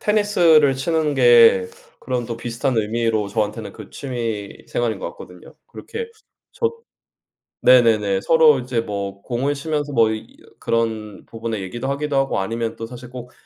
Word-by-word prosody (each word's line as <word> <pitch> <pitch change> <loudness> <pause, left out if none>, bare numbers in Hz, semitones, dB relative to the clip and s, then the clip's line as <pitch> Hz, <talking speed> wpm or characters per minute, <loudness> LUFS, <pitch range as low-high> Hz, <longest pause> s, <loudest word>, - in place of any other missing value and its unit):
테니스를 175 -9 +4
치는 155 +2 0
게 120 -7 +6 0.3
그런 125 -2 -3
또 115 -1 -5
비슷한 120 +2 -2
의미로 110 -1 0
저한테는 105 +1 -3
그 110 -3 -12
취미 115 -6 -5
생활인 115 -4 -1
것 - - -4
같거든요. 90 +1 -14
그렇게 460 0 -7 0.4
저 460 - 0 0.9
네네네 110 -6 +4
서로 160 -3 +5
이제 125 -1 -2
뭐 100 -3 -5
공을 130 +4 -1
치면서 145 0 -3
뭐 115 -4 +4
이 110 - -8 0.2
그런 110 -3 -2
부분의 115 -2 -5
얘기도 120 +8 -5
하기도 140 0 -2
하고 135 -5 +1
아니면 115 +3 -3
또 115 - -6
사실 125 +1 -11
꼭 125 -1 -9
120 Hz, 310 characters per minute, -21 LUFS, 110-140 Hz, 0.9 s, 게